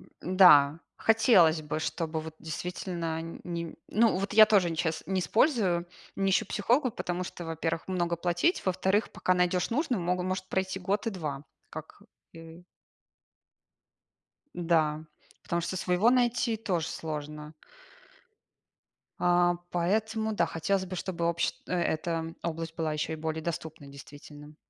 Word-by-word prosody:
М. 185 +1 -7
Да, 150 -4 +7 0.2
хотелось 185 -8 +4
бы, 150 +1 -3
чтобы 160 0 -3
вот 160 0 -9
действительно 165 0 -4 0.2
ни 170 -2 -5
ну 220 -2 +3
вот, 195 +2 -3
я 215 0 +8
тоже 190 -6 +3
щас 160 -1 -2
не 190 0 0
использую, 195 - +2 0.3
не 195 0 +1
ищу 190 - +2
психолога, 245 +5 +1
потому 180 -3 -3
что, 175 - -8
во-первых, 165 +1 -3
много 175 -2 -1
платить, 175 - 0
во-вторых, 190 +3 +1
пока 185 - 0
найдешь 180 +1 +1
нужное, 255 - 0
могу 180 +1 -1
может 185 +1 -3
пройти 190 0 -2
год 200 +5 -1
и - - +1
2, 150 -7 -5 0.3
как - - -10 0.3
и 165 +1 -12 1.9
Да, 160 -3 +1 0.4
потому 170 0 -2
что 180 - -3
своего 180 +6 +2
найти- 240 -2 +1
тоже 180 -6 -2
сложно. 150 -1 -6 1.7
А, 175 0 +3 0.2
поэтому 220 +5 0
да, 170 -5 +2
хотелось 190 +4 -1
бы, 185 0 -6
чтобы 170 -2 -2
общ 170 0 0
эта 165 -2 -1
область 165 -1 -4
была 160 -2 -1
еще 150 +1 -2
и - - -2
более 160 0 -4
доступной, 160 -3 -6
действительно, 145 +2 -13
175 Hz, 140 wpm, -29 LUFS, 160-190 Hz, 1.9 s, я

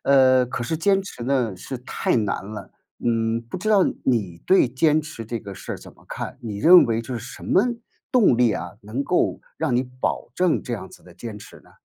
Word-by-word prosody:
呃， 130 -2 +5
可 125 - -4
是 160 +7 -2
坚 195 +4 +2
持 155 -11 -8
呢， 125 -7 0
是 125 +8 -6
太 125 - -1
难 105 -4 -1
了。 105 +1 -8 0.3
嗯， 115 -1 +1
不 120 +7 -7
知 210 +5 -3
道 205 -3 +5 0.2
你 100 -9 0
对 190 -9 +5
坚 150 +5 +3
持 130 -6 -8
这 115 +1 -4
个 100 - -8
事 - - -7
儿 - - -6
怎 - - -13
么 - - -23
看？ - - -6
你 105 -4 -5
认 175 - +8
为 115 -1 0
这 130 +2 -6
是 - - -10
什 - - -13
么 - - +4 0.5
动 220 - +5
力 120 -2 +4
啊， 90 -3 -5
能 110 +7 -3
够 - - +1 0.2
让 125 - 0
你 125 - +3 0.2
保 - - -1
证 180 -2 +2
这 125 - -5
样 105 -5 -5
子 - - -16
的 90 - -15
坚 110 +3 -7
持 105 - -13
呢？ - - -20
120 Hz, 245 characters per minute, -23 LUFS, 110-140 Hz, 0.5 s, 认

